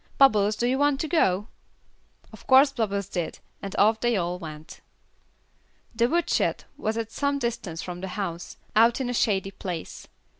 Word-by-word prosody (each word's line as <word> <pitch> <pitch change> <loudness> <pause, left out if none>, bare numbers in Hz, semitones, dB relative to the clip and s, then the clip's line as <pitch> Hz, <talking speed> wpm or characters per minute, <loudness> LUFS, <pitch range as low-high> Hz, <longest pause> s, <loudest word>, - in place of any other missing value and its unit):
Bubbles, 215 -6 +5
do 235 - -1
you 260 +2 +1
want 290 -1 +2
to 315 - -2
go?" 210 - +2 0.9
Of - - -14
course 270 +2 +7
Bubbles 200 -6 -2
did, 175 -4 -4 0.2
and 195 - -6
off 220 +2 +4
they 240 -2 +1
all 175 0 -2
went. 155 -2 -10 1.1
The 235 +1 +2
woodshed 340 +2 +1
was 220 +1 -2
at 225 -1 -3
some 280 +2 0
distance 225 -10 -3
from 180 -1 -6
the 190 - -4
house, 175 -4 -5 0.2
out 230 +3 +5
in 250 -2 -2
a - - -3
shady 195 -5 +1
place. 180 -4 -7
220 Hz, 165 wpm, -26 LUFS, 185-250 Hz, 1.1 s, course